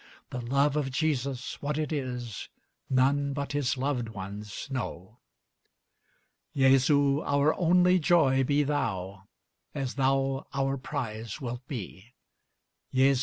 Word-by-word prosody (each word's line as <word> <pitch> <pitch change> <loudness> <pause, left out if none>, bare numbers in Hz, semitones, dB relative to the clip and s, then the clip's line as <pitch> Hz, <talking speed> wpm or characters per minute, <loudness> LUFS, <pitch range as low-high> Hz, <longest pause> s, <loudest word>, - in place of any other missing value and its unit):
The 125 - -4
love 140 +4 +2
of 145 -3 0
Jesus, 135 -3 -2
what 145 +1 -2
it 155 -1 -2
is 125 -6 -4 0.4
None 140 +2 +2
but 140 0 -3
his 145 -3 0
loved 130 -3 -1
ones 105 +2 -7
know. 110 -4 -5 1.4
Jesu! 140 +1 +4
our 145 +1 +2
only 180 +1 +4
joy 145 -5 +4
be 145 +2 +2
thou, 100 -9 -2 0.5
As 135 -3 -2
thou 135 0 +1
our 135 0 +1
prize 115 -6 -5
wilt 125 0 -6
be! 115 -1 -7 0.8
Jesu! 135 0 +4
135 Hz, 120 wpm, -28 LUFS, 125-145 Hz, 1.4 s, Jesu